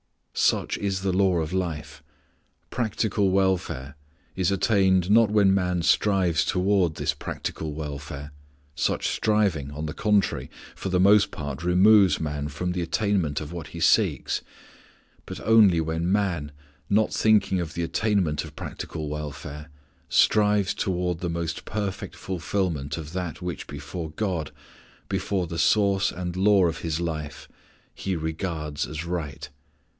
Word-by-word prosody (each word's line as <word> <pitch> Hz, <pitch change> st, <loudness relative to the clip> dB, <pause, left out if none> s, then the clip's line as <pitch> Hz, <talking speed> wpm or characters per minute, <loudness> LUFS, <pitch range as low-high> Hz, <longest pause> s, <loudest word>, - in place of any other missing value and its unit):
Such -, -, +1 dB
is 95 Hz, -2 st, -1 dB
the 95 Hz, -1 st, 0 dB
law 95 Hz, -2 st, +3 dB
of 80 Hz, +2 st, -4 dB
life: 85 Hz, -5 st, -3 dB, 0.7 s
practical 110 Hz, -4 st, 0 dB
welfare 95 Hz, -8 st, 0 dB, 0.4 s
is 95 Hz, -2 st, +1 dB
attained 95 Hz, -2 st, +2 dB
not 115 Hz, 0 st, +6 dB
when 100 Hz, -2 st, +4 dB
man 90 Hz, -3 st, 0 dB
strives 90 Hz, 0 st, +3 dB
toward 90 Hz, -3 st, +1 dB
this -, -, -1 dB
practical 80 Hz, -2 st, -5 dB
welfare 70 Hz, -1 st, -6 dB, 0.4 s
such -, -, 0 dB
striving, 100 Hz, -10 st, +1 dB
on 75 Hz, +2 st, -5 dB
the 75 Hz, -, -4 dB
contrary, 105 Hz, +2 st, +1 dB, 0.2 s
for 95 Hz, -, -5 dB
the 90 Hz, -1 st, +1 dB
most 100 Hz, +1 st, +6 dB
part 70 Hz, +1 st, -6 dB
removes 95 Hz, +1 st, +5 dB
man 75 Hz, -2 st, -3 dB
from 75 Hz, +5 st, -3 dB
the 90 Hz, 0 st, -2 dB
attainment 85 Hz, -3 st, 0 dB
of 75 Hz, +2 st, -7 dB
what 85 Hz, -3 st, -6 dB
he -, -, -9 dB
seeks; -, -, +2 dB, 0.9 s
but -, -, -6 dB
only 105 Hz, -6 st, +5 dB
when 80 Hz, +2 st, -1 dB
man, 90 Hz, -8 st, 0 dB, 0.4 s
without 105 Hz, +1 st, +2 dB
thinking 105 Hz, -4 st, +3 dB
of 80 Hz, -2 st, -4 dB
the 85 Hz, -, -1 dB
attainment 85 Hz, -5 st, 0 dB
of 75 Hz, -2 st, -11 dB
practical 75 Hz, 0 st, -6 dB
welfare, 75 Hz, 0 st, -6 dB, 0.4 s
strives 105 Hz, -2 st, +3 dB
toward 90 Hz, -2 st, -1 dB
the 90 Hz, -, -3 dB
most 85 Hz, -1 st, -3 dB
perfect 100 Hz, -3 st, -4 dB
fulfilment 85 Hz, -5 st, -2 dB
of 80 Hz, 0 st, -7 dB
that 90 Hz, -5 st, -4 dB
which 90 Hz, -4 st, -5 dB
before 80 Hz, +3 st, -6 dB
God, 80 Hz, -4 st, -2 dB, 0.6 s
before 95 Hz, -1 st, -1 dB
the 85 Hz, 0 st, -5 dB
Source 100 Hz, -2 st, +3 dB
and 90 Hz, 0 st, -5 dB
Law 100 Hz, 0 st, +4 dB
of 85 Hz, -1 st, -1 dB
his 80 Hz, -1 st, -2 dB
life, 75 Hz, -4 st, -4 dB, 0.5 s
he 95 Hz, -1 st, -3 dB
regards 80 Hz, -2 st, -3 dB
as 75 Hz, +2 st, -5 dB
right. 80 Hz, -6 st, -4 dB
90 Hz, 140 wpm, -25 LUFS, 80-100 Hz, 0.9 s, not